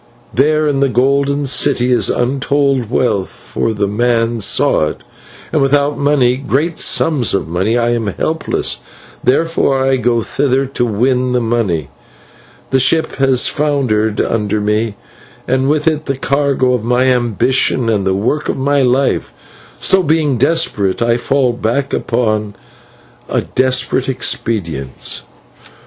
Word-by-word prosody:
There 155 +3 +2
in 140 -2 0
the 140 0 +2
Golden 140 +3 +1
City 125 -1 +2
is 125 - +3
untold 135 -1 0
wealth, 105 -6 0
for 115 - -4
the 105 -2 -1
man 115 +1 0
saw 90 - +3
it, - - -7 0.5
and - - +2
without 140 +1 +2
money, 135 -4 +2
great 145 +5 -1
sums 135 -11 +2
of 100 - -2
money, 95 +8 0
I 120 0 +1
am 115 -2 -1
helpless, 160 - -2 0.5
therefore 135 0 +1
I 135 0 +2
go 120 -2 0
thither 135 +2 0
to 130 -2 -2
win 125 +3 0
the 125 - +2
money. 110 - -1 0.8
The 135 - +3
ship 160 +5 +1
has 135 -2 +3
foundered 125 -8 0
under 105 -1 0
me, 105 +1 -1 0.5
and 130 +2 +1
with 150 +1 0
it 155 -1 0
the 135 - -2
cargo 140 -2 +1
of 125 -4 -1
my 125 +2 +1
ambitions 125 0 +1
and 105 -3 0
the 95 0 0
work 125 +10 -1
of - - -1
my 140 +1 +1
life; 130 +1 +1 0.5
so, 190 - +3
being 155 -5 +1
desperate, 125 - +1
I 115 0 +2
fall 130 0 +1
back 120 +4 -2
upon 110 -3 -1 0.7
a - - 0
desperate 130 0 0
expedient. 85 - -3
125 Hz, 140 wpm, -15 LUFS, 115-140 Hz, 0.8 s, is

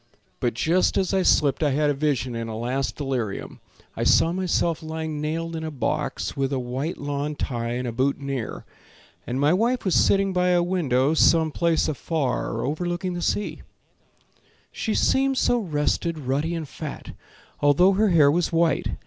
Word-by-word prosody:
But 120 -2 -1
just 170 +9 +2
as 190 0 0
I 190 - +3
slipped 145 -5 +3
I 150 - +3
had 145 +2 +2
a - - 0
vision 135 -3 -1
In 115 0 -4
a 110 -1 -5
last 125 +4 -2
delirium: 130 -8 -4 0.4
I - - -2
saw 165 - +4
myself 175 -2 0
lying 160 -1 -4
nailed 165 +2 -3
in 160 - -4
a 160 - -3
box 145 -5 -2
With 135 -1 -1
a 135 - 0
white 130 +6 -3
lawn 145 +1 -3
tie 120 -4 -3
and 125 +1 -3
a - - -2
boutonnière, 135 0 -2 0.6
And 125 +2 -2
my 145 +3 +3
wife 235 +5 +1
was 185 - +1
sitting 195 -1 +3
by 180 0 +2
a 175 -1 +3
window 150 -6 +1
Some 160 0 +4
place 170 +1 +1
afar 145 -6 -2
overlooking 175 +5 -2
the 175 - -4
sea; 205 +4 -2 1.1
She 220 - -2
seemed 270 0 +2
so 245 -1 +2
rested, 165 -2 -1
ruddy 145 +4 -1
and 160 -3 -4
fat, 150 +1 -7 0.5
Although 145 +7 +5
her 210 +2 +2
hair 155 -5 +5
was 170 +2 0
white. 165 -1 +1
155 Hz, 175 wpm, -24 LUFS, 135-175 Hz, 1.1 s, Although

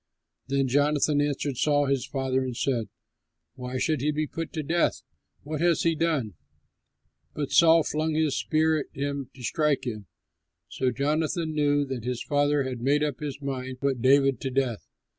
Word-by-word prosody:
Then 135 0 +1
Jonathan 145 +2 +2
answered 145 -2 -1
Saul 145 +1 +2
his 135 -2 0
father 130 -1 -1
and 125 -2 -4
said, 120 -5 -1 0.6
"Why 125 -1 -5
should 155 +1 0
he 150 - +1
be 155 +1 0
put 165 +2 -6
to 155 - -3
death? 170 +4 0 0.4
What 150 +1 -4
has 170 -1 +3
he 165 - +3
done?" 155 - -1 1.0
But 145 -2 -3
Saul 165 -1 +6
flung 155 +1 -1
his 155 -3 +1
spear 155 0 +1
at 145 - -5
him 140 -2 -3
to 130 - -11
strike 145 0 0
him. 105 -5 -5 0.6
So 130 - 0
Jonathan 155 +5 -1
knew 145 -1 +2
that 130 -4 -5
his 125 0 -3
father 145 -1 +2
had 130 -2 -5
made 145 +4 +2
up 145 -3 -2
his 145 -1 -6
mind 130 -1 -4
to 140 +2 0
put 130 -3 -3
David 135 -1 +4
to 135 - -2
death. 130 -4 -1
140 Hz, 180 wpm, -26 LUFS, 130-150 Hz, 1.0 s, Saul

